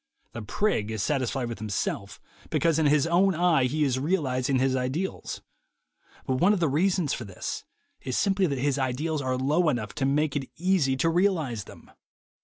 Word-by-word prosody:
The 120 - -6
prig 110 - 0
is 110 -2 -2
satisfied 130 -3 -1
with 115 -1 -6
himself 105 -3 -3 0.3
because 165 -2 +2
in 155 - +3
his 145 0 +3
own 180 +3 +3
eye 165 -5 +3
he 150 +4 0
is 130 -3 +1
realizing 135 -5 0
his 130 0 +2
ideals; 130 +9 -3 0.8
but 130 - 0
one 195 +4 +5
of 205 - 0
the 165 - +2
reasons 175 +1 +1
for - - -4
this 95 -4 -6 0.4
is 130 - -3
simply 195 -1 +2
that 140 -3 -2
his 140 +1 0
ideals 140 +4 -1
are 130 -1 -1
low 150 +6 +2
enough 115 -7 -2
to 135 - -1
make 150 +1 +1
it 135 -2 -3
easy 170 -7 +1
to 150 - +1
realize 160 - 0
them. - - -15
140 Hz, 185 wpm, -27 LUFS, 130-170 Hz, 0.8 s, one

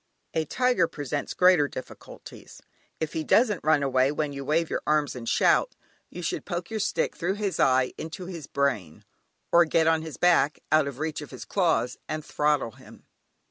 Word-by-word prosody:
A 160 -1 0
tiger 245 - +2
presents 145 -3 -4
greater 180 -5 +5
difficulties. 130 - -11 0.4
If 160 0 -3
he 160 - -2
doesn't 210 - +2
run 155 -2 +3
away 130 0 +2
when 150 -1 -2
you 140 0 -6
wave 160 +4 +1
your - - -3
arms 150 -2 +1
and 115 -2 -5
shout, - - +3 0.3
you 180 - -8
should - - -2
poke 175 +1 -5
your 220 - -2
stick 215 - -1
through 185 +3 -1
his 205 -2 -3
eye 130 -1 +3
into 165 +4 -6
his 170 -5 -8
brain, 110 - -2 0.5
or 175 - +7
get 160 0 +2
on 160 0 +3
his 160 -1 -8
back, 160 -5 +3
out 155 -2 +4
of 140 -3 -6
reach 155 +1 -3
of 150 - -9
his 130 - -9
claws, 170 -10 0
and 155 -1 -4
throttle 150 -5 0
him. - - -16
155 Hz, 185 wpm, -26 LUFS, 140-175 Hz, 0.5 s, or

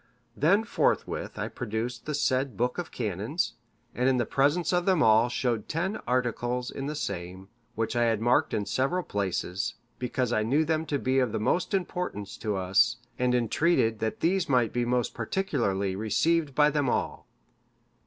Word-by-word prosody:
Then 195 +9 +3
forthwith 230 - -1
I - - -2
produced 115 +2 -4
the 150 - -1
said 130 -5 0
book 125 +7 0
of 175 - -4
canons,(567) 110 - -2 0.5
and 125 +1 +4
in 130 - +2
the 120 - +1
presence 150 - +1
of 180 +1 +1
them 185 -5 +4
all 110 +2 +5
showed 120 -3 -1
ten 175 +6 -1
articles 125 0 -1
in 135 0 -5
the 150 - -3
same, 95 -5 -5 0.3
which 115 +1 -2
I 120 0 +3
had 115 -2 +1
marked 120 +3 +2
in 105 - -1
several 135 - 0
places, 100 - -2 0.2
because 125 -1 -1
I 110 - +2
knew 140 +9 +2
them 160 0 0
to 145 - 0
be 130 0 +1
of 125 -4 +1
the - - -2
most 175 - +1
importance 180 - -3
to 105 -2 -2
us, 95 +5 +3 0.2
and 125 0 +2
entreated 120 -1 +2
that 110 0 -3
these 175 0 +1
might 125 -4 +2
be 120 0 0
most 120 -1 0
particularly 100 - -1
received 140 - +1
by 150 0 +5
them 145 -1 +1
all. - - -2
125 Hz, 175 wpm, -28 LUFS, 110-150 Hz, 0.5 s, all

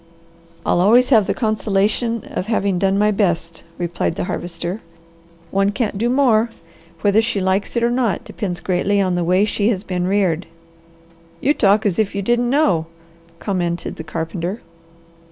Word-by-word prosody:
"I'll 175 - +2
always 240 +6 +5
have 220 -7 +5
the - - +1
consolation 215 +1 0
of 185 - -3
having 200 -5 0
done 195 +1 +2
my 210 +1 +3
best," 170 -5 -1
replied 170 -1 -2
the - - -2
Harvester. 175 +3 -4 0.7
"One 195 +1 +2
can't 210 -1 -2
do 235 +2 +1
more! 240 -4 +3 0.5
Whether 205 +3 +4
she 225 -3 -1
likes 190 +3 0
it 235 - +1
or 235 - +2
not 240 -6 0
depends 180 -4 -5
greatly 195 +2 +1
on 185 -2 +1
the 175 0 0
way 185 +4 +3
she 210 0 0
has 200 -4 -1
been 180 -2 -2
reared." 185 -3 +1 0.9
"You 285 - +2
talk 210 -4 +3
as 195 -2 +1
if 205 -2 0
you 200 - -2
didn't 240 +3 +1
know," 195 - +2 0.5
commented 175 -3 -3
the 160 - -6
carpenter. 165 +5 -4
200 Hz, 165 wpm, -20 LUFS, 180-220 Hz, 0.9 s, always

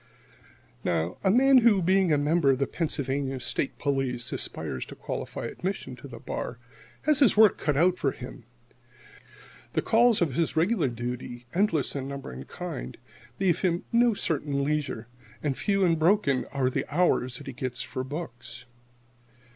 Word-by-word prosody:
Now, 85 0 -1
a 190 - +3
man 260 +5 +6
who, 225 -4 +5
being 185 0 +3
a 150 - +4
member 150 +1 +2
of 135 - +4
the 140 - +1
Pennsylvania 135 -4 -2
State 135 - -2
Police,[69 135 -4 0
1] - - -2
aspires 65 - -3
to - - -10
qualify - - -5
for - - -3
admission 185 -8 -4
to 125 - -10
the 120 -3 -9
bar, 120 - -5 0.5
has 300 -2 +3
his 265 -6 +5
work 215 -2 +6
cut 150 -3 0
out 180 +3 +3
for - - +1
him. - - -9 1.3
The - - 0
calls 235 0 +4
of 165 -6 +1
his 165 +3 0
regular 175 0 +2
duty, 120 0 -5
endless 170 -8 +1
in 135 -1 -3
number 140 - -6
and 65 +1 -9
kind, - - -6 0.4
leave 185 -4 +2
him 175 -2 0
no 235 -1 +4
certain 145 -5 -1
leisure, 145 -6 -2 0.4
and 145 -3 0
few 195 +3 +1
and 165 -2 +2
broken 160 -6 +3
are 130 -2 0
the - - -3
hours 145 -6 +2
that - - -11
he 135 - -6
gets 130 0 -3
for 130 - -4
books. 130 -5 -7
145 Hz, 170 wpm, -27 LUFS, 130-185 Hz, 1.3 s, man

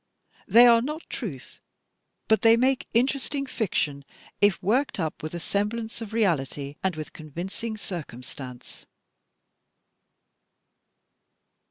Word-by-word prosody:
They 240 +2 +8
are 235 -1 +7
not 300 +6 -5
truth, 165 - -6 0.7
but 220 - +4
they 230 -1 +6
make 260 +2 +2
interesting 275 +3 +1
fiction, 155 - -1 0.4
if 205 -1 +4
worked 240 +4 +1
up 160 -3 -2
with 155 +2 -5
a - - -3
semblance 220 +5 -2
of 220 -2 -6
reality 145 - 0
and 190 -3 +1
with 155 -1 -7
convincing 180 +8 -6
circumstance. 130 - -8
205 Hz, 110 wpm, -26 LUFS, 155-235 Hz, 0.7 s, They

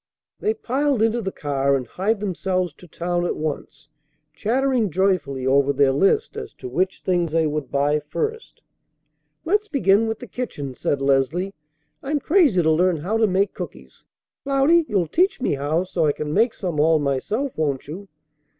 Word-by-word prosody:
They 430 +1 0
piled 275 - 0
into 225 +1 +1
the 190 -3 -3
car, 140 -3 0
and 130 -2 -2
hied 200 - -1
themselves 185 -3 -1
to 180 - -16
town 175 +2 -2
at 175 - -1
once, 150 -1 -5 0.5
chattering 245 - +1
joyfully 170 -8 0
over 140 +1 +3
their 140 -1 +3
list 195 - +2
as 435 -1 -7
to 130 - -9
which 185 +9 -1
things 175 -4 0
they 165 -1 +3
would 150 -3 -2
buy 145 +2 +1
first. 445 - -5 0.8
"Let's 415 +5 +1
begin 225 - +3
with 220 -1 -2
the 245 - -9
kitchen," 180 - -5
said 135 +2 -2
Leslie. 140 +8 +1 0.5
"I'm 295 +2 -1
crazy 290 - +3
to 160 - +3
learn 175 +2 +2
how 190 +9 -1
to 225 -1 +3
make 195 +1 +1
cookies. - - -9 0.4
Cloudy, 280 +5 +3
you'll 195 -5 +1
teach 375 - +1
me 255 - 0
how 145 +5 0
so 170 -4 0
I 145 - +2
can 150 0 -4
make 225 +5 +2
some 175 -6 -3
all 160 +1 +4
myself, 155 - -2
won't 145 -4 -2
you?" 185 +7 -8
180 Hz, 175 wpm, -22 LUFS, 145-230 Hz, 0.8 s, all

